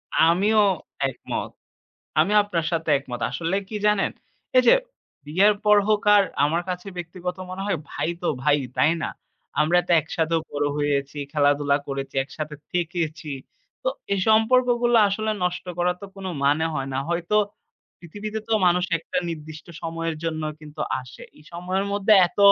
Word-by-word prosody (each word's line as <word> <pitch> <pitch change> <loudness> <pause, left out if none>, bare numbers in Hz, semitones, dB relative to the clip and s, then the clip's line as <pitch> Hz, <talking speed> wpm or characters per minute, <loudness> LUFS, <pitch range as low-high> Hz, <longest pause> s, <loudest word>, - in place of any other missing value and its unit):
আমিও 195 +7 +4 0.5
একমত। 130 - -5 0.7
আমি 205 - +3
আপনার 175 -6 -2
সাথে 165 -2 -1
একমত। 125 -3 -7
আসলে 165 +8 -1
কি 215 - -8
জানেন? 210 -2 +2 0.5
এইযে 255 -1 +7 0.5
বিয়ের 195 +7 +4
পর 210 0 +6
হোক 215 -1 +2
আর 200 - +5 0.2
আমার 165 +4 +1
কাছে 180 +1 -4
ব্যক্তিগত 180 +1 -5
মনে 185 +1 -5
হয় 190 -6 0
ভাই, 145 +2 -2
তো 175 - -1 0.2
ভাই, 150 -1 +4 0.2
তাই 155 - +4
না? - - -1 0.5
আমরা 170 +4 +4
তো - - -7
একসাথেও 160 +1 -1
বড় 145 0 -1
হয়েছি, 140 -1 -1 0.2
খেলাধুলা 145 -1 +3
করেছি, 135 -1 -5
একসাথে 150 +1 -6 0.2
থেকেছি। 170 -2 -2 0.5
তো - - 0 0.2
এই 200 - +2
সম্পর্কগুলা 240 +1 +4
আসলে 215 +2 -1
নষ্ট 180 0 -2
করার 180 0 +1
তো 200 - -6
কোনো 195 -1 -5 0.2
মানে 145 +3 +3
হয় 135 -2 -2
না। 130 - -1
হয়তো 170 +4 -1 0.6
পৃথিবীতে 205 +6 -6
তো - - -1
মানুষ 180 +1 +3
একটা 165 - -3
নির্দিষ্ট 155 -1 -8 0.2
সময়ের 165 0 -3
জন্য 160 -1 -2 0.2
কিন্তু 150 0 -11 0.2
আসে। 125 -1 -13 0.2
এই 150 - -18
সময়ের 185 +3 -2
মধ্যে 205 +1 +3 0.2
এত - - -26
170 Hz, 155 wpm, -24 LUFS, 150-195 Hz, 0.7 s, এইযে